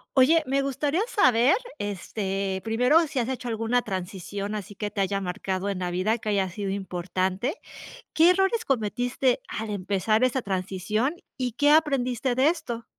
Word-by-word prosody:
Oye, 305 +5 +5
me 275 +1 +1
gustaría 285 +6 0
saber, 255 - +4 0.2
este, 195 -1 -3
primero, 250 +7 +4
si 275 - -2
has 240 +1 -1
hecho 255 -1 -4
alguna 230 +2 0
transición, 195 +1 -4
así 205 -1 -6
que 210 0 -3
te 200 - -2
haya 195 +1 0
marcado 185 +1 -3
en 195 -2 -3
la 180 -1 -2
vida, 190 +6 +1
que 215 - -5
haya 195 -2 +1
sido 195 +2 -4
importante, 190 - -2 0.6
¿qué 330 +2 +6
errores 385 +5 +2
cometiste 245 +2 0
al 220 0 -4
empezar 205 +3 0
esa 255 0 +2
transición 195 - -1 0.2
y 250 -2 -1
qué 290 +6 +3
aprendiste 260 -5 +2
de 260 +4 +4
esto? 240 -9 -3
225 Hz, 160 wpm, -26 LUFS, 195-260 Hz, 0.6 s, qué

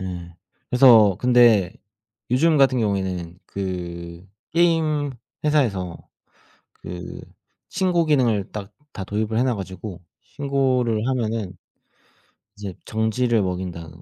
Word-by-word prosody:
예. 90 -2 -6 0.4
그래서 115 -7 +7
근데 120 -7 +4 0.6
요즘 155 +6 +3
같은 135 -2 +4
경우에는 95 -5 -2
그 85 -2 -6 0.3
게임 160 -4 +2 0.3
회사에서 110 - +1 0.8
그 90 +1 -8 0.5
신고 180 -3 +1
기능을 120 -10 +1
딱 100 -2 -7 0.2
다 95 - -5
도입을 110 +2 -2
해 - - +3
놓아 130 -2 +1
가지고 95 -2 -7 0.2
신고를 130 -5 0
하면은 115 -7 -2 1.0
이제 100 -2 -6
정지를 110 +1 +1
먹인다 90 -3 -4
110 Hz, 225 characters per minute, -22 LUFS, 95-130 Hz, 1.0 s, 그래서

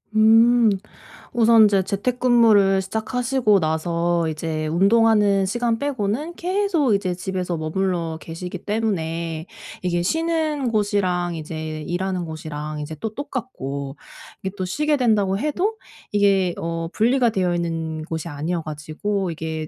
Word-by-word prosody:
음. 225 +2 +6 0.6
우선 230 -1 +6
인제 200 -3 +4
재택근무를 220 -2 +3
시작하시고 220 +1 +1
나서 170 +1 0
이제 155 0 -3
운동하는 200 +2 +4
시간 235 +3 0
빼고는 280 +4 -2
계속 360 - +1
이제 185 -2 -1
집에서 180 -1 -3
머물러 165 0 -1
계시기 175 +3 -7
때문에 170 -7 -2 0.4
이게 175 -1 0
쉬는 310 - 0
곳이랑 185 -5 0
이제 155 0 -5
일하는 180 +2 -2
곳이랑 155 -1 -6
이제 150 +1 -5
또 220 -1 -4
똑같고 140 - -5 0.4
이게 190 +1 -5
또 185 - -2
쉬게 300 +10 0
된다고 210 -6 +2
해도 355 - -1 0.4
이게 195 -3 +2
어 165 0 -3
분리가 240 +3 +3
되어 185 -4 0
있는 165 -2 -3
곳이 160 0 -4
아니어 165 +3 -3
가지고 155 +6 -3
이게 160 -1 -4
190 Hz, 290 characters per minute, -22 LUFS, 165-225 Hz, 0.6 s, 음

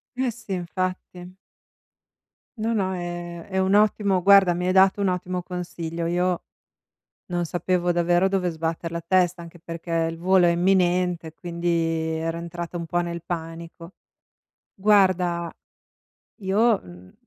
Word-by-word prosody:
Eh 255 0 0
sì, 220 -4 -7
infatti. 185 0 -4 1.2
No, 225 +1 -1
no 190 -3 0
è 175 -1 -6
è 190 - -4
un 190 +1 +2
ottimo 205 -2 +3
guarda, 195 -1 +6
mi 180 +1 -2
hai 185 - +2
dato 190 +1 +5
un 200 - +2
ottimo 180 0 -2
consiglio. 170 -2 -5
Io 180 +1 0 0.8
non 175 -1 -2
sapevo 175 +1 0
davvero 175 +2 +2
dove 190 -2 0
sbatter 165 +1 -3
la 170 - -3
testa, 180 0 +1
anche 170 +1 -12
perché 165 +1 -8 0.2
il 165 - -8
volo 185 +1 +4
è - - +4
imminente, 180 -2 +1
quindi 170 +1 -5 0.5
ero 165 +1 -2
entrata 170 +1 -6
un 170 -1 -4
po' 175 +2 0
nel 170 -1 -4
panico. 165 0 -7 0.8
Guarda, 185 -4 +2 0.9
io, 210 +3 +2
mhmm, 90 +1 -14
175 Hz, 140 wpm, -24 LUFS, 170-190 Hz, 1.2 s, guarda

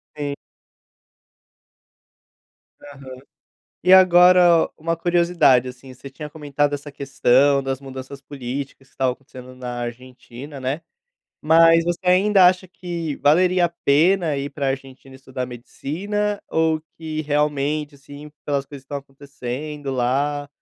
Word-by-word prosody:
Sim. 145 -1 -4 2.5
Aham. 135 -2 -11 0.7
E 185 +2 +4
agora, 180 -2 +6
uma 165 +1 -2
curiosidade, 170 -7 +2
assim: 130 +1 -11
você 135 +2 -12
tinha 150 +2 -8
comentado 145 -1 -2
essa 145 0 -8
questão 140 0 +2
das 135 0 -3
mudanças 135 0 -9
políticas 135 0 -7
que - - -32
estavam 130 -1 0
acontecendo 130 -1 -13
na 125 -1 -6
Argentina, 125 +3 -9
né. 135 +5 -3 0.6
Mas 165 +1 +5
você 175 0 -2
ainda 190 +1 +5
acha 185 +1 0
que 170 -4 -5
valeria 180 +5 +3
a - - -2
pena 165 +1 +2
ir 140 +1 -4
pra 140 -1 -3
Argentina 135 0 -6
estudar 130 -1 -6
medicina 195 - -4
ou 160 -1 +1 0.2
que 155 -1 -4
realmente, 150 0 -1
assim, 145 +2 -12
pelas 140 -2 -1
coisas 140 -1 -11
que - - -39
estão 140 +1 -5
acontecendo 140 +1 -7
lá, 140 +3 -1
145 Hz, 130 wpm, -21 LUFS, 135-165 Hz, 2.5 s, agora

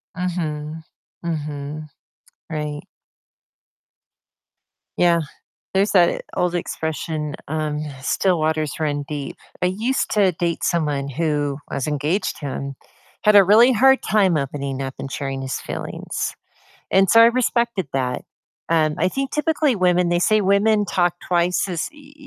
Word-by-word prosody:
Mhm. 160 -4 -3 0.4
Mhm. 150 -2 -4 0.6
Right. 150 -2 -4 2.1
Yeah, 170 -1 +4 0.5
there's 195 +2 +3
that 175 -3 +3
old 180 0 +1
expression, 160 -2 -3
um, 155 -1 -2 0.2
"Still 180 +4 +1
waters 155 -1 0
run 145 -2 -1
deep." 145 -2 -5 0.3
I - - +4
used 225 +8 -1
to 195 -4 +3
date 170 0 -2
someone 150 -6 0
who- 145 -1 -1
I - - -4
was 135 - -2
engaged 150 +6 -1
to 145 - -5
him- 140 0 -4 0.5
had 210 -1 +6
a 200 - +9
really 230 +6 +6
hard 265 +3 +5
time 195 -6 +3
opening 140 -1 -3
up 135 0 -5
and 135 - -6
sharing 135 -1 -4
his 130 - -3
feelings, - - -4 0.6
and 195 -1 +4
so 230 - +7
I 230 - +9
respected 235 - +1
that, 125 -2 -2 0.5
um, 155 -1 +2
I - - +2
think 270 +5 -3
typically 300 -5 +1
women, 180 -1 +3
they 175 - +2
say 215 +4 +3
women 205 +2 +3
talk 175 -3 +1
twice 180 +2 +1
as 175 - -2
u 290 -1 -16
170 Hz, 140 wpm, -21 LUFS, 150-195 Hz, 2.1 s, a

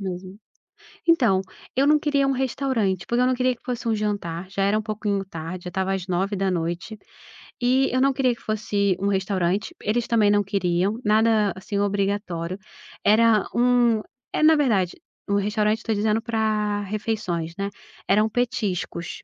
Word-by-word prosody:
mesmo. 185 0 -6 0.7
Então, 240 - +4 0.4
eu 270 - +4
não 300 +1 +6
queria 285 -2 +1
um - - +2
restaurante, 250 -8 -1
porque 240 +1 +1
eu 250 - +4
não 255 - +2
queria 255 0 +1
que - - -30
fosse 245 -1 -4
um 225 - +2
jantar, 190 -4 -3
já 195 0 -1
era 200 +2 +2
um - - 0
pouquinho 210 -2 -2
tarde, 175 -1 -7
já - - -3
estava 190 +2 -1
às 190 -1 -4
21h 185 0 -1 0.6
e 255 +2 +3
eu 255 - +1
não 275 0 +3
queria 255 -2 +1
que - - -21
fosse 205 -3 0
um 200 - -1
restaurante, 195 - 0
eles 230 +3 0
também 220 -3 +3
não 205 0 +3
queriam, 195 +1 0
nada 215 -2 +3
assim 200 +2 -4
obrigatório. 200 -3 -1 0.4
Era 220 0 +4
um 240 -2 +3 0.3
eh, - - 0
na 315 +1 +7
verdade, 215 - +1 0.3
um 200 - +1
restaurante, 210 +2 +1
tô 225 - 0
dizendo 215 +1 +1
pra 215 -2 0
refeições, 200 -5 -3
né, 200 0 -2 0.4
eram 215 +2 +3
petiscos. 205 -7 -2
210 Hz, 165 wpm, -24 LUFS, 190-230 Hz, 0.7 s, na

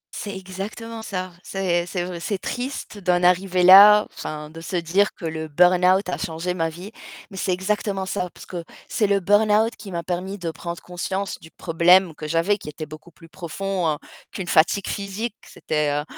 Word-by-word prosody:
C'est 200 -2 -5
exactement 205 +5 -7
ça. 185 -3 -4
C'est 175 -3 -1
c'est 175 -1 -3
v 180 -2 -6
c'est 200 +3 -2
triste 245 -2 -5
d'en 180 -1 +1
arriver 180 0 +3
là, 205 +3 +9
enfin, 150 0 -6
de 165 - -10
se 175 +3 -5
dire 180 +4 +2
que - - -8
le 160 0 -4
burn-out 180 +4 +4
a 180 - -2
changé 170 +2 -3
ma 165 -2 -1
vie. 180 +6 -10 0.4
Mais - - -10
c'est 185 - -1
exactement 195 +1 -1
ça 180 -2 -2
parce - - -14
que 175 -2 -6 0.2
c'est 210 - +1
le 200 0 +2
burn-out 210 +3 +3
qui 200 -2 -10
m'a 170 -1 -3
permis 185 +3 -3
de 170 -3 -4
prendre 170 +1 -6
conscience 190 +2 -4
du 160 - -14
problème 175 +2 +3
que 155 0 -7
j'avais, 165 +6 +1
qui - - -8
était 155 +1 -7
beaucoup 155 +3 -12
plus 165 0 -17
profond 175 -1 -2 0.3
qu'une 190 -3 -6
fatigue 175 +4 +3
physique. 205 +3 -4
C'était, 150 -1 -1
heu, 145 +1 -1
180 Hz, 190 wpm, -23 LUFS, 170-200 Hz, 0.4 s, là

